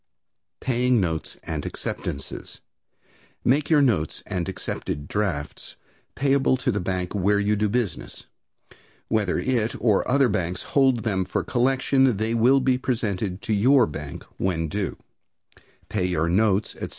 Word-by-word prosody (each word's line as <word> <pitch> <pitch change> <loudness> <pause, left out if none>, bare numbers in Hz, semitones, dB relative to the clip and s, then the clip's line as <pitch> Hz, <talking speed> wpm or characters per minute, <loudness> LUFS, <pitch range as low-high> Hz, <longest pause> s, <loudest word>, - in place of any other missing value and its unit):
Paying 125 -1 +2
Notes 80 -4 -2
and - - -4
Acceptances. 70 - -6 0.9
Make 140 +4 +2
your 150 -3 +5
notes 95 - 0
and 90 0 -3
accepted 75 -5 -5
drafts 95 -9 -3 0.4
payable 135 -1 +2
at 130 - +2
the 105 - 0
bank 90 -1 -2
where 100 +1 +2
you 105 +1 +2
do 105 0 +1
business. 110 -7 -3 0.8
Whether 105 -5 +1
it 120 -2 0
or 105 -2 +2
other 135 0 +4
banks 90 -5 -2
hold 130 -4 +2
them 95 -4 0
for - - -2
collection, 130 -1 +2
they 110 +2 -1
will 125 +4 +4
be 130 -1 +2
presented 105 -7 -2
to 110 - -1
your 125 +5 +5
bank 75 -2 -7
when 85 -4 -1
due. 100 +3 -3 0.9
Pay 95 -4 -1
your 85 -3 0
notes, 100 +3 +2
etc. - - -5
105 Hz, 140 wpm, -24 LUFS, 90-125 Hz, 0.9 s, your